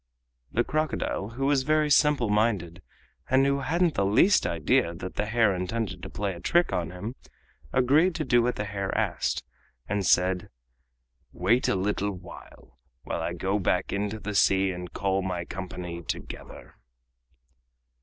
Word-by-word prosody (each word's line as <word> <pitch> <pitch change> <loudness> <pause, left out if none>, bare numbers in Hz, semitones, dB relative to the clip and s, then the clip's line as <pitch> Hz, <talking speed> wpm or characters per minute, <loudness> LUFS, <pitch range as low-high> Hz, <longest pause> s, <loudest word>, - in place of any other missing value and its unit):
The 120 - +2
crocodile, 155 -9 -1
who 135 +2 -1
was 140 -1 +3
very 150 +2 +2
simple 145 -4 +4
minded, 105 -5 0 0.5
and 130 +1 +4
who 140 0 +2
hadn't 165 +5 +1
the - - +1
least 110 - +4
idea 85 +1 +1
that 90 +2 -7
the 105 - -2
hare 110 -2 +3
intended 95 +4 -3
to - - -7
play 100 -1 -3
a 85 - -9
trick 175 0 +2
on 85 -2 -1
him, 90 +7 -6 0.6
agreed 145 +8 +3
to 165 - -1
do 120 -2 +4
what 125 +1 0
the 105 - -2
hare 100 -1 -3
asked, - - -1 0.4
and 100 0 -1
said: 90 0 +2 0.8
"Wait 110 +8 +2
a - - +2
little 100 +1 -1
while 90 -8 -13 0.3
I - - -2
go 100 +2 -1
back 90 -1 0
into 105 +2 -2
the 105 0 -5
sea 95 -1 +3
and 90 0 -7
call 95 -1 0
my 90 -2 -3
company 90 -2 -6
together!" - - -8
105 Hz, 155 wpm, -27 LUFS, 90-130 Hz, 0.8 s, simple